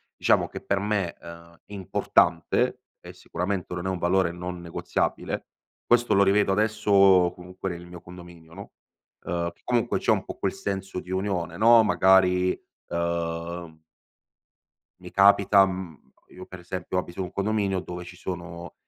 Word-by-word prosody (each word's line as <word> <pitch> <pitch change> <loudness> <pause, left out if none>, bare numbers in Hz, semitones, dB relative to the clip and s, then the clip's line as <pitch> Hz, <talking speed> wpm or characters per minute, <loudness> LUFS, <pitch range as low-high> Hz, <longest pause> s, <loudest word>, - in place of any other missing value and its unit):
diciamo - - +2
che - - -9
per 100 -1 -1
me, 100 -4 -1
ehm, 85 0 -13
importante 100 -3 +1 0.2
e - - -11
sicuramente 90 +1 -4
non 90 +1 -5
è - - 0
un 95 - -2
valore 90 0 +2
non 90 0 -6
negoziabile; 85 -1 -3 0.4
questo 120 0 +3
lo 100 - +5
rivedo 100 0 +3
adesso 100 -4 +4
comunque 90 +2 -7
nel 85 0 -7
mio 90 0 -11
condominio 85 -2 -13
no, - - -10 0.5
ehm, 85 0 -2
che - - -33
comunque 120 -2 0
c'è - - +1
un - - +1
po' - - -7
quel - - -1
senso 95 -2 -4
di 90 - -11
unione 95 -3 -2
no, 115 +1 +6
magari, 90 -1 +4 0.4
ehm 85 -1 -3 1.2
mi - - -10
capita, 100 0 +5
mhmm 90 -5 -6 0.3
io 95 0 -11
per 95 - -10
esempio 90 +1 -5
abito 90 +1 -4
un 90 - -5
condominio 100 -2 0
dove 90 -1 -7
ci 90 +1 -11
sono, 85 -1 -7
90 Hz, 155 wpm, -25 LUFS, 85-100 Hz, 1.2 s, no